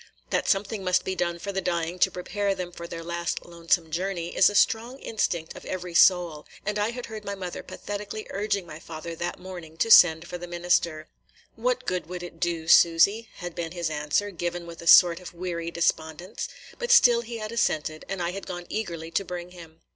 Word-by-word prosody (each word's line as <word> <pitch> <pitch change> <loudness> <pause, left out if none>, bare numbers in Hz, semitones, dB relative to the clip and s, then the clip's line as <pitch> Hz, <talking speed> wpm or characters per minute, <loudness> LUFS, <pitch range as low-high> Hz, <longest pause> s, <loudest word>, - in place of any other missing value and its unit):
That - - 0
something 200 0 0
must 185 0 +2
be 190 - -1
done 175 -1 -1
for 200 +4 -5
the 195 0 -2
dying 170 0 -2
to 190 - +5
prepare 195 +2 -2
them 180 -2 -5
for 170 -1 -8
their 165 0 -7
last 170 0 -3
lonesome 170 -1 0
journey 175 0 -3
is - - +6
a 205 - -5
strong 230 +5 +2
instinct 170 -10 -2
of - - -10
every 180 -2 -5
soul; 170 -3 +4 0.2
and 210 0 -1
I 205 +2 +1
had 245 +1 -6
heard 220 -2 -8
my 200 -1 -4
mother 185 -2 -6
pathetically 205 +1 -6
urging 200 -1 -1
my 155 -2 -9
father 165 0 -7
that 175 +1 -3
morning 175 -4 -10
to 225 - +1
send 165 -3 +8
for 180 -1 -6
the 175 - -7
minister. 170 -2 0 0.5
"What - - -1
good 180 -3 -2
will 180 0 -6
it 170 -2 -9
do, 165 -2 -1
Susy?" 170 +8 +5
had 175 -2 -6
been 165 0 -4
his 170 -3 -2
answer, 150 +7 0
given 175 -1 -4
with 170 -1 -10
a 170 - -8
sort 175 0 +8
of 180 -1 -10
weary 170 -1 -3
despondence; 170 0 -1 0.3
but 485 -1 -3
still 245 - +7
he 235 0 -6
had 215 0 -5
assented, 155 -9 0
and 190 -2 -2
I 170 - -1
had 195 +1 -7
gone 175 -1 -6
eagerly 170 -7 -4
to 195 - +1
bring 180 -1 -7
him. 165 -2 -13
175 Hz, 210 wpm, -26 LUFS, 170-200 Hz, 0.5 s, send